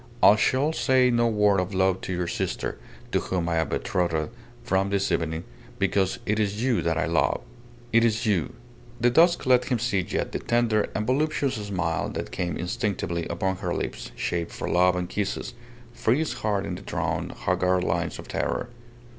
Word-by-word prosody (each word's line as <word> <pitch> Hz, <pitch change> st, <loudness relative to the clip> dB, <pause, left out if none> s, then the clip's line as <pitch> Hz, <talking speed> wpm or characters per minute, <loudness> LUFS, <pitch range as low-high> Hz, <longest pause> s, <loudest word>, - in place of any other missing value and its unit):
"I 105 Hz, -, +9 dB
shall 135 Hz, +8 st, +2 dB
say 130 Hz, -4 st, +3 dB
no 120 Hz, 0 st, +3 dB
word 105 Hz, -3 st, +3 dB
of 90 Hz, +1 st, -2 dB
love 95 Hz, 0 st, +2 dB
to -, -, -5 dB
your 90 Hz, -1 st, -1 dB
sister, 85 Hz, -, -3 dB, 0.3 s
to -, -, +2 dB
whom 90 Hz, -2 st, -2 dB
I 85 Hz, -1 st, 0 dB
am 80 Hz, -2 st, 0 dB
betrothed 85 Hz, -4 st, -1 dB, 0.3 s
from 95 Hz, +1 st, +1 dB
this 100 Hz, -1 st, 0 dB
evening, 80 Hz, 0 st, -1 dB, 0.3 s
because 95 Hz, -1 st, +1 dB
it 105 Hz, +1 st, +1 dB
is 105 Hz, +1 st, 0 dB
you 125 Hz, -3 st, +2 dB
that 80 Hz, -1 st, 0 dB
I -, -, +1 dB
love. 85 Hz, 0 st, +1 dB, 0.5 s
It 115 Hz, 0 st, +6 dB
is 115 Hz, -1 st, +1 dB
you!"... 100 Hz, -7 st, +1 dB, 0.5 s
The 120 Hz, +1 st, +3 dB
dusk 170 Hz, +6 st, +4 dB
let 125 Hz, -1 st, +4 dB
him 125 Hz, -1 st, 0 dB
see 115 Hz, -4 st, 0 dB
yet 90 Hz, -, -2 dB
the -, -, -2 dB
tender 115 Hz, -3 st, +1 dB
and 105 Hz, -, -1 dB
voluptuous 140 Hz, +1 st, +1 dB
smile 95 Hz, -7 st, -2 dB
that -, -, -4 dB
came 90 Hz, -3 st, -2 dB
instinctively 90 Hz, -2 st, -2 dB
upon 95 Hz, +2 st, -1 dB
her -, -, -2 dB
lips -, -, -4 dB
shaped 85 Hz, -1 st, -2 dB
for -, -, -5 dB
love 90 Hz, +1 st, +4 dB
and 90 Hz, 0 st, -2 dB
kisses, 105 Hz, +5 st, -3 dB, 0.4 s
freeze 130 Hz, +7 st, +1 dB
hard 100 Hz, -2 st, -1 dB
in -, -, -3 dB
the -, -, -6 dB
drawn, -, -, -2 dB
haggard 90 Hz, 0 st, 0 dB
lines 85 Hz, -1 st, -1 dB
of -, -, -10 dB
terror. -, -, -2 dB
100 Hz, 185 wpm, -26 LUFS, 90-120 Hz, 0.5 s, I